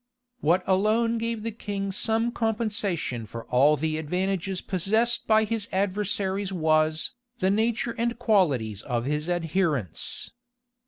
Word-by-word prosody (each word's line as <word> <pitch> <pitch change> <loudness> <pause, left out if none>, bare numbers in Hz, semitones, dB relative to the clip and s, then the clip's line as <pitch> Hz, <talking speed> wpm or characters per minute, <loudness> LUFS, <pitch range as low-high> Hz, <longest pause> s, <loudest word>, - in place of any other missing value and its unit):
What 180 +1 +2
alone 220 +4 +2
gave 230 -1 -2
the 230 - -2
king 200 -2 -4
some 225 +4 +1
compensation 210 - -1
for 115 +2 -8
all 145 +4 +4
the 155 +1 -1
advantages 185 +3 -1
possessed 220 +7 +1
by 220 0 +5
his 220 -1 -2
adversaries 195 0 -1
was, 155 -2 +2 0.3
the 190 -2 +2
nature 230 +2 +1
and 235 0 0
qualities 145 - +1
of 120 -1 -2
his 150 +4 -2
adherents. 165 - -1
190 Hz, 125 wpm, -26 LUFS, 155-220 Hz, 0.3 s, by